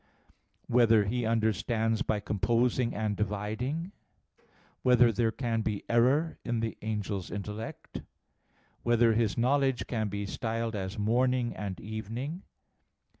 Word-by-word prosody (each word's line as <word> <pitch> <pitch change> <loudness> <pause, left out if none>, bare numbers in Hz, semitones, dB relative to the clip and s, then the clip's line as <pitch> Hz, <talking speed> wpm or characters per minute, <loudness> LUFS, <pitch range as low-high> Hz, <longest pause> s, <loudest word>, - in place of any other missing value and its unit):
(4) - - -3
Whether 115 -3 +5
he 120 +3 -1
understands 110 0 +1
by 105 - 0
composing 115 +4 +1
and 105 -1 -1
dividing? 110 - -2 0.5
(5) - - -33 0.4
Whether 125 -2 +5
there 115 +1 +1
can 115 -2 -1
be 105 -2 -2
error 130 +8 +2
in 120 -1 -1
the 115 0 -2
angel's 105 -3 -3
intellect? 105 +2 -6
(6) - - -9 0.8
Whether 120 -1 +4
his 110 -2 +1
knowledge 130 -2 +2
can 110 -3 -1
be 100 0 -3
styled 115 +2 -3
as 95 +2 -4
morning 120 +3 +1
and 100 -3 -5
evening? 115 - -5
115 Hz, 130 wpm, -30 LUFS, 105-120 Hz, 0.8 s, Whether